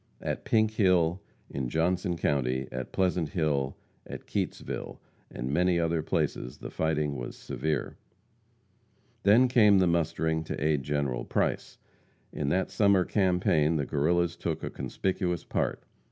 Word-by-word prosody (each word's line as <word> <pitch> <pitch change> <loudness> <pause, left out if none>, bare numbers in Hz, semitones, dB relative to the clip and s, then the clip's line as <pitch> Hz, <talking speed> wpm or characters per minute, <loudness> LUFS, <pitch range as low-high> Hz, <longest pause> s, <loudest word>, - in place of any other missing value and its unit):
At - - -4
Pink 110 -1 +3
Hill, 90 -4 +2 0.3
in 65 -3 -4
Johnson 85 +3 0
county, 65 -3 0
at 65 0 -5
Pleasant 90 -4 0
Hill, 75 -5 -1 0.3
at - - -8
Keytesville, - - -4 0.3
and 65 +3 -4
many 90 +1 +3
other 85 -1 +1
places 60 -4 -2
the - - -8
fighting 75 -3 -1
was - - -6
severe. 80 -2 -3 1.2
Then 110 +6 +5
came 105 -5 +5
the 95 - +4
mustering 80 -1 0
to - - -4
aid 75 -1 +1
General 70 -3 -1
Price. - - -1 0.6
In 70 -2 -2
that 95 +5 0
summer 100 -3 +3
campaign 90 -5 +2
the 75 -3 0
Guerrillas 85 +4 +1
took 80 -2 -3
a - - -3
conspicuous 90 -3 -2
part. - - -2
80 Hz, 140 wpm, -28 LUFS, 75-90 Hz, 1.2 s, Then